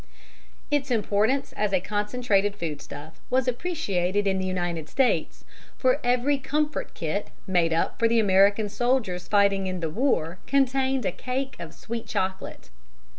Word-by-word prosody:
Its 290 -1 +1
importance 225 +3 +1
as 210 -1 -1
a 190 - +3
concentrated 205 0 0
foodstuff 155 -2 -7
was 255 0 +1
appreciated 205 - -1
in 190 -1 +1
the 185 - -2
United 175 -4 -2
States, 265 -2 0 0.3
for 255 +1 +2
every 250 +3 +2
"comfort 295 +2 -2
kit" 165 +5 -2 0.2
made 175 -3 +2
up 165 - 0
for 230 - +4
the 230 +1 +2
American 200 +1 +4
soldiers 215 -5 0
fighting 200 -2 +3
in 185 -1 -3
the 165 -2 -2
war 185 - 0
contained 270 -2 +2
a - - +1
cake 260 +6 -4
of - - -7
sweet 230 0 -6
chocolate. 190 - -3
205 Hz, 145 wpm, -26 LUFS, 185-255 Hz, 0.3 s, for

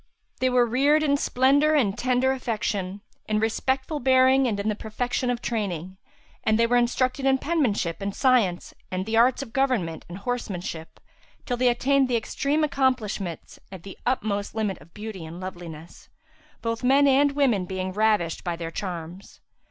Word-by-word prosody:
They 255 - +2
were 250 -1 +4
reared 280 +6 +3
in 285 -2 +3
splendour 285 +3 +3
and 210 -9 +2
tender 250 +2 +1
affection, 210 -6 -3 0.3
in 215 0 +1
respectful 260 +6 -1
bearing 260 0 +4
and 210 -4 -1
in 200 - -2
the 215 - +2
perfection 245 +4 -3
of 245 0 -2
training; 190 -5 -3 0.5
and 220 0 +2
they 230 - +4
were 240 +1 +1
instructed 255 +2 +1
in 265 0 +4
penmanship 245 - -1
and 200 0 -3
science 235 -10 +2 0.2
and 185 0 -3
the 220 +1 -2
arts 245 +4 +4
of 225 -4 -13
government 240 -13 0
and 175 - -7
horsemanship, 195 -7 -5 0.5
till 245 - -1
they 250 0 +3
attained 270 +3 +2
the 245 -2 +1
extreme 280 +7 -1
accomplishments 250 - -1
and 185 -3 -10
the 195 - -9
utmost 210 -5 -1
limit 210 -4 -2
of 160 +4 -17
beauty 210 -4 -7
and 165 +2 -8
loveliness; 175 -3 -9 0.5
both 230 +1 -2
men 275 +3 +5
and 280 +1 +4
women 250 -10 +2
being 185 0 -4
ravished 210 -5 +1
by 175 -1 -2
their 165 -1 -6
charms. 175 0 -7
230 Hz, 165 wpm, -25 LUFS, 190-260 Hz, 0.5 s, men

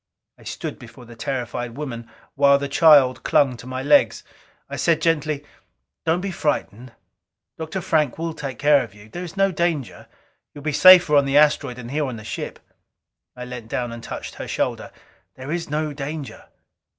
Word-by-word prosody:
I - - -17
stood - - -6
before 120 +1 -13
the 120 0 -13
terrified 120 -1 -4
woman 120 -6 -6 0.2
while 140 0 +5
the 140 0 -3
child 140 -3 +5
clung 135 -3 +2
to 120 - -12
my 130 0 -4
legs. 280 - +3 0.4
I - - -6
said 165 -2 +2
gently, 155 -3 0 0.6
"Don't 165 +2 +2
be 195 0 -3
so - - -10
frightened. 125 -5 -2 0.7
Dr. 160 +4 -4
Frank 150 -6 +1
will 165 0 -3
take 135 -5 -6
care 145 -1 +4
of 110 -4 -12
you. 105 +1 -15
There 175 +10 -6
is 175 +2 -9
no 195 0 +3
danger; 160 - -2 0.5
you 145 - -9
will - - -15
be 155 - -1
safer 180 -2 +8
on 140 -1 +5
the 135 +1 +2
asteroid 145 -4 +3
than 120 -1 -9
here 150 +2 -1
on 125 - -5
the 110 - -10
ship." - - -6 0.8
I 125 0 -7
leaned 125 -3 -9
down 120 0 -3
and 115 0 -8
touched - - -7
her - - -6
shoulder. - - -2 0.4
"There 130 +3 -7
is 170 -2 -3
no 150 0 -2
danger." 145 0 -7
140 Hz, 190 wpm, -22 LUFS, 125-155 Hz, 0.8 s, safer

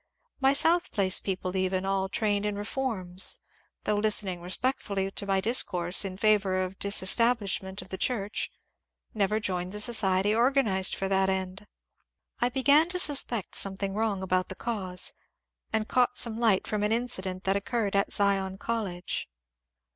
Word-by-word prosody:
My 270 0 +4
South 335 +5 +2
Place 190 -2 +2
people 185 -1 -4
even, 185 0 -1
all 195 0 -1
trained 205 -1 0
in 210 -1 -2
reforms, 205 -4 0 0.4
though 210 0 0
listening 205 -4 +2
respect 215 +9 -2
fully 195 -1 -3
to 200 - -7
my 195 -1 +1
discourse 185 -5 +2
in 190 -1 -6
favour 195 -3 +2
of 185 +1 -7
disestablishment 200 -1 +2
of - - -15
the 190 - -6
church, 210 -5 -1 0.6
never 210 0 0
joined 185 -3 -3
the 210 - -5
society 205 -3 +3
organized 230 -6 +2
for 195 - -2
that 190 0 +2
end. 190 +2 -4 0.7
I 240 - +1
began 285 +6 +3
to 365 - -2
suspect 270 - +1
something 195 0 -1
wrong 210 -2 -1
about 185 0 0
the 190 - -6
cause, 190 -6 -1 0.6
and 220 0 -1
caught 250 0 +1
some 230 -1 0
light 220 -5 +2
from 210 -1 -2
an 210 +1 0
incident 190 -6 -1
that 195 +1 +1
occurred 205 0 -2
at 200 - +1
Zion 195 -1 +1
College. 195 - -4
200 Hz, 155 wpm, -27 LUFS, 190-225 Hz, 0.7 s, My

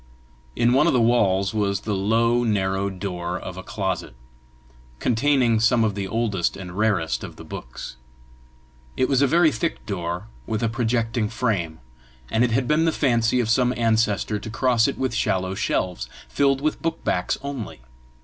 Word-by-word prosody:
In 120 +1 +3
one 145 +5 +4
of - - +3
the 125 - +3
walls 100 -5 +2
was 100 -2 0
the 105 - -2
low, 115 +5 +2
narrow 100 -3 0
door 90 -2 -4
of 95 0 -7
a 95 - -6
closet, 95 - -3 0.8
containing 125 - +2
some 115 +1 +3
of 110 -2 +1
the 100 -1 -3
oldest 105 -4 -1
and 90 -2 -8
rarest 100 -6 0
of - - -8
the - - -11
books. 60 0 -8 1.0
It 130 - +2
was 135 -1 +2
a 140 - +5
very 165 +3 +4
thick 110 -3 -3
door, 90 -2 -3 0.2
with 110 0 -2
a 115 - +2
projecting 115 -1 0
frame, 105 -9 -1 0.5
and 110 - +3
it 125 - +2
had 125 +2 0
been 155 +2 +3
the 165 - +3
fancy 120 -5 +2
of 115 -3 0
some 125 +1 +2
ancestor 110 -2 +1
to 110 - -7
cross 120 0 +2
it 140 - -3
with 130 -2 -1
shallow 95 -4 0
shelves, 90 -9 -2 0.2
filled 135 -1 +1
with 155 +1 -1
book 165 0 -2
backs 90 - 0
only. 135 - -6
110 Hz, 175 wpm, -23 LUFS, 95-125 Hz, 1.0 s, a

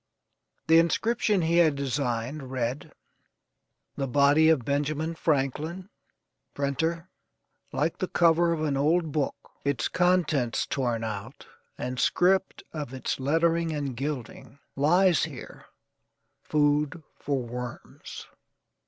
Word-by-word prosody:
The 165 +1 +6
inscription 210 +3 +1
he 165 +1 +2
had 160 -4 +4
designed 135 0 -2
read: 130 +1 -3 1.1
"The 135 - -1
body 145 +4 +4
of 145 -7 +2
Benjamin 150 +3 -1
Franklin, 160 - -1 0.6
printer; 160 +5 -1 0.6
Like 160 +3 -1
the 185 - -1
cover 170 0 +3
of 160 -2 -1
an 145 -3 0
old 160 +3 +2
book 145 -1 -1 0.3
Its 140 -1 0
contents 175 -9 +1
torn 120 -4 -1
out, 110 +3 -6 0.3
and 125 0 -4
script 190 +8 +2
of 145 -5 -5
its 130 - -3
lettering 165 +4 +1
and 140 -4 -3
gilding: 135 -2 -6 0.2
Lies 175 +5 +3
here - - -10 0.7
food 150 +1 +1 0.2
for 140 -3 -1
worms." 120 0 -8
145 Hz, 110 wpm, -27 LUFS, 135-165 Hz, 1.1 s, The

